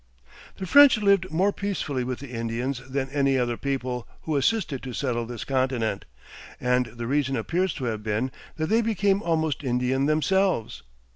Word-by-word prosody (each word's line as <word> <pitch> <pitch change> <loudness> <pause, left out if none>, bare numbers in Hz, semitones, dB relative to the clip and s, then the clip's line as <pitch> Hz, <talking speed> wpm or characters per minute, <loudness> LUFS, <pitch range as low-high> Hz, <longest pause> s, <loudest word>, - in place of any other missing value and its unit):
The 190 - -4
French 285 +5 +7
lived 200 -3 +3
more 190 +6 +1
peacefully 170 -10 -2
with 125 0 -3
the 140 -2 -10
Indians 115 +3 -3
than 135 0 -1
any 140 -2 +2
other 120 -1 0
people 130 -2 -3 0.2
who 155 - -2
assisted 145 - 0
to 130 -2 -7
settle 120 -3 -2
this 120 -2 -6
continent, 130 -6 -1 0.5
and 125 0 +1
the 120 +1 -7
reason 135 +1 0
appears 170 - 0
to 135 - -6
have 110 -3 -2
been 110 +4 -1 0.2
that 155 - -1
they 225 +2 +4
became 205 -3 +1
almost 160 -4 0
Indian 130 +2 +1
themselves. 175 - +1
135 Hz, 165 wpm, -25 LUFS, 125-170 Hz, 0.5 s, French